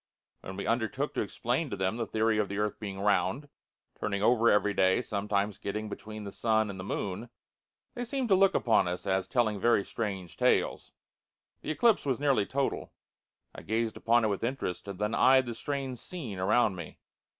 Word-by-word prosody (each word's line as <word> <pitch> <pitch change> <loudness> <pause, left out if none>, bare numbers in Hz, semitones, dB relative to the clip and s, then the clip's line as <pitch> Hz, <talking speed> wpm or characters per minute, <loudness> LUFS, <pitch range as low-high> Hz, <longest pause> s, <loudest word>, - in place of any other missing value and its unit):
When 95 0 -8
we - - -4
undertook 120 +5 -1
to - - -1
explain 120 - -1
to 100 - -3
them 95 +3 -1
the 115 -2 -2
theory 110 0 +1
of 105 - 0
the 100 - -4
earth 105 0 -1
being 100 -3 -6
round, 105 +7 +1 0.5
turning 100 0 -2
over 115 0 +4
every 105 0 +3
day, 95 +5 +3
sometimes 100 -1 -1
getting 105 +2 -4
between 110 +1 -7
the 100 - -6
sun 110 -2 +1
and 95 - -9
moon, 100 +4 -4 0.6
they 245 -3 -4
seemed 260 +1 -2
to 195 - +6
look 195 +1 +4
upon 110 -6 +3
us 90 0 -4
as 95 -1 0
telling 110 -5 +1
very 115 -1 +3
strange 95 -6 -4
tales. - - +1 0.7
The - - -6
eclipse 220 +8 +3
was 135 -3 -1
nearly 135 -8 +2
total. 140 0 -2 0.6
I - - -9
gazed 110 0 -1
upon 115 0 +3
it - - +2
with 100 +1 -2
interest, 115 -7 -3
and 100 -2 -6
then 105 +2 -1
eyed 130 +1 +5
the 120 - -4
strange 135 +1 -4
scene 125 - -7
around 105 +2 +3
me. 85 -3 -8
110 Hz, 190 wpm, -29 LUFS, 100-125 Hz, 0.7 s, to